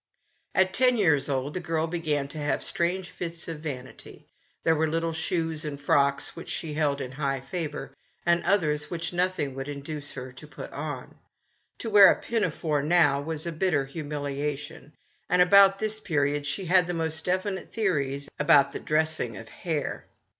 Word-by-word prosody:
At 185 Hz, 0 st, +3 dB
ten 250 Hz, -1 st, +4 dB
years 150 Hz, -9 st, +3 dB
old 135 Hz, +1 st, -1 dB
the 185 Hz, -, -2 dB
girl 165 Hz, -2 st, -1 dB
began 155 Hz, -4 st, -1 dB
to 155 Hz, -, -7 dB
have 145 Hz, 0 st, -1 dB
strange 175 Hz, +2 st, -1 dB
fits 170 Hz, -1 st, -6 dB
of 165 Hz, -3 st, -5 dB
vanity. 130 Hz, -5 st, -8 dB, 0.4 s
There 160 Hz, -, +4 dB
were 160 Hz, +1 st, +1 dB
little 165 Hz, +1 st, -1 dB
shoes 160 Hz, 0 st, -1 dB
and 145 Hz, -2 st, -5 dB
frocks 140 Hz, -2 st, +1 dB
which -, -, -9 dB
she 160 Hz, -3 st, -3 dB
held 145 Hz, -2 st, 0 dB
in 125 Hz, -, -5 dB
high 135 Hz, 0 st, -1 dB
favour, 140 Hz, -1 st, -5 dB, 0.3 s
and 170 Hz, 0 st, +3 dB
others 150 Hz, -7 st, +2 dB
which 170 Hz, 0 st, -4 dB
nothing 175 Hz, -6 st, 0 dB
would 135 Hz, +1 st, -5 dB
in 145 Hz, -1 st, -5 dB
duce 145 Hz, 0 st, -5 dB
her 130 Hz, -1 st, -7 dB
to 130 Hz, +4 st, -12 dB
put 150 Hz, -, -9 dB
on. 145 Hz, -3 st, -6 dB, 0.6 s
To 225 Hz, -, -5 dB
wear 205 Hz, -2 st, +9 dB
a -, -, -1 dB
pinafore, 165 Hz, -9 st, -1 dB
now, 145 Hz, -3 st, +3 dB
was 160 Hz, +1 st, -4 dB
a 170 Hz, -, -2 dB
bitter 160 Hz, -4 st, +1 dB
humiliation, 145 Hz, +1 st, -5 dB, 0.4 s
and 180 Hz, -, +3 dB
about 195 Hz, +2 st, +7 dB
this 215 Hz, +1 st, -1 dB
period 145 Hz, -5 st, 0 dB
she 150 Hz, +6 st, -2 dB
had 180 Hz, 0 st, +4 dB
the 175 Hz, -, -2 dB
most 160 Hz, -1 st, -2 dB
definite 190 Hz, +2 st, -2 dB
theories 140 Hz, -10 st, -1 dB
about 140 Hz, -2 st, +5 dB
the -, -, -5 dB
dressing 155 Hz, -7 st, 0 dB
of 115 Hz, -, -10 dB
hair. 155 Hz, -6 st, -3 dB
155 Hz, 175 wpm, -27 LUFS, 145-175 Hz, 0.6 s, wear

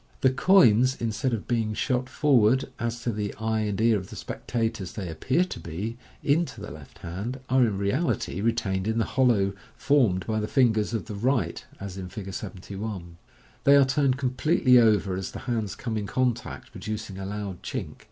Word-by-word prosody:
The 130 Hz, -, +5 dB
coins, 130 Hz, -, +5 dB
instead 115 Hz, +3 st, -1 dB
of 115 Hz, -3 st, -3 dB
being 110 Hz, -3 st, 0 dB
shot 130 Hz, +1 st, 0 dB
forward 130 Hz, -3 st, +3 dB
(as 120 Hz, -1 st, -3 dB
to 120 Hz, -, 0 dB
the 105 Hz, -1 st, -3 dB
eye 110 Hz, +1 st, -1 dB
and 105 Hz, -2 st, -1 dB
ear 110 Hz, -2 st, +4 dB
of 95 Hz, -, -10 dB
the -, -, -9 dB
spectators 110 Hz, -6 st, -3 dB
they 100 Hz, -4 st, -5 dB
appear 125 Hz, -, +1 dB
to -, -, -7 dB
be) 95 Hz, +8 st, -5 dB, 0.3 s
into 150 Hz, -4 st, +1 dB
the 105 Hz, -, -7 dB
left 75 Hz, -3 st, -12 dB
hand, 100 Hz, +10 st, -5 dB
are, 130 Hz, 0 st, +4 dB
in 105 Hz, -5 st, +1 dB
reality, 100 Hz, -, -1 dB
retained 100 Hz, -4 st, 0 dB
in 110 Hz, +1 st, 0 dB
the 115 Hz, -, +2 dB
hol 130 Hz, -1 st, +2 dB
low 100 Hz, -5 st, +2 dB, 0.2 s
formed 115 Hz, -11 st, +2 dB
by 110 Hz, -1 st, -1 dB
the 105 Hz, -, -2 dB
fingers 115 Hz, -4 st, +2 dB
of 110 Hz, -, -3 dB
the 110 Hz, -, -7 dB
right, 120 Hz, +5 st, 0 dB, 0.2 s
as 95 Hz, -1 st, -6 dB
in 90 Hz, -1 st, -6 dB
Fig. 95 Hz, 0 st, -7 dB
71. 95 Hz, -3 st, -6 dB, 0.5 s
They 140 Hz, -, +7 dB
are 140 Hz, -1 st, +7 dB
turned 135 Hz, -1 st, +2 dB
com 130 Hz, -2 st, -1 dB
pletely 130 Hz, -2 st, +4 dB
over 105 Hz, -4 st, +3 dB
as 95 Hz, 0 st, -4 dB
the -, -, -6 dB
hands 115 Hz, -5 st, -2 dB
come 115 Hz, -3 st, -3 dB
in 105 Hz, -1 st, -3 dB
contact, 125 Hz, -1 st, -2 dB
producing 105 Hz, -3 st, -6 dB
a 95 Hz, -, -5 dB
loud 100 Hz, -3 st, -5 dB
chink. -, -, -5 dB
110 Hz, 195 wpm, -26 LUFS, 100-130 Hz, 0.5 s, They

